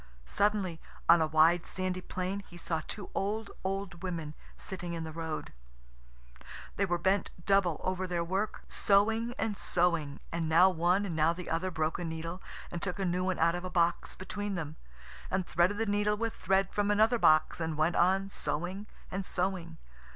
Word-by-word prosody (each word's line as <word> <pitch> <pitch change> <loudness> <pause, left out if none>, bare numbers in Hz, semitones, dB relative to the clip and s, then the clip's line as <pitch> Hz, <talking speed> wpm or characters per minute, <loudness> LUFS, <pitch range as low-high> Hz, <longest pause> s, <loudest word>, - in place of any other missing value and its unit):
Suddenly, 195 - 0 0.3
on 170 0 +7
a 160 - +3
wide, 160 +2 +4
sandy 185 -1 -2
plain, 185 +2 -3
he 175 - -11
saw 165 -2 -2
two 205 - -6
old, 210 +2 -2
old 190 -2 -3
women 165 -5 -4 0.2
sitting 175 -2 -5
in 165 - -4
the 160 - -5
road. 160 -1 -5 1.2
They 200 - +1
were 175 -1 +1
bent 190 +3 +1 0.2
double 195 -5 +3
over 185 0 -1
their 175 -1 -1
work, 190 +5 -2
sewing 225 +4 +2
and 220 -2 -1
sewing, 170 -7 0
and 165 -1 -1
now 180 +4 +6
one 180 +4 +2
and 175 -5 -3
now 160 +1 +3
the 180 +1 -7
other 170 +3 0
broke 160 -2 -1
a - - -3
needle, 165 +2 -5 0.3
and 175 - -4
took 180 -1 -2
a 195 - -1
new 180 +1 0
one 185 -1 0
out 170 +1 +3
of 175 +1 -4
a 185 - -4
box 170 -1 +1
between 205 +2 -4
them, 155 -3 -4 0.5
and 185 -1 0
threaded 175 +6 +2
the 225 - 0
needle 205 0 +1
with 230 +1 -2
thread 195 0 +1
from 205 0 +1
another 220 +3 +4
box, 155 -1 +4
and 160 -2 -2
went 160 +3 +2
on 190 +2 +3
sewing 190 +2 -3 0.2
and 195 +1 -2
sewing. 180 - -2
180 Hz, 185 wpm, -31 LUFS, 165-195 Hz, 1.2 s, on